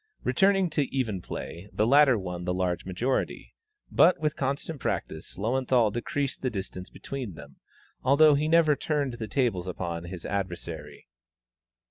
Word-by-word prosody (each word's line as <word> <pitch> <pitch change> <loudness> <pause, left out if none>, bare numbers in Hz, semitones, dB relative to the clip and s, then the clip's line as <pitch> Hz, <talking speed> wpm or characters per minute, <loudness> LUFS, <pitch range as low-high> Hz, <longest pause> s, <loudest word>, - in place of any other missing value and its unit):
Returning 195 -1 +3
to 145 - +1
even 115 -9 -1
play, 85 +3 -7
the 110 - +1
latter 135 0 +6
won 90 -3 -5
the 90 0 0
large 90 -2 -1
majority; 115 +9 -2 0.4
but 180 - +5
with 150 -1 0
constant 140 +3 -2
practice, 80 -9 -4
Löwenthal 120 0 +2
decreased 135 +4 -2
the 130 - 0
distance 95 -4 -6
between 130 -10 -6
them, 70 -2 -12 0.4
although 145 +3 +6
he 145 +2 +1
never 160 -2 +5
turned 145 -3 -1
the 115 -2 -5
tables 110 -7 0
upon 85 -2 -4
his 85 -1 -8
adversary. 85 -6 -5
115 Hz, 145 wpm, -27 LUFS, 90-140 Hz, 0.4 s, latter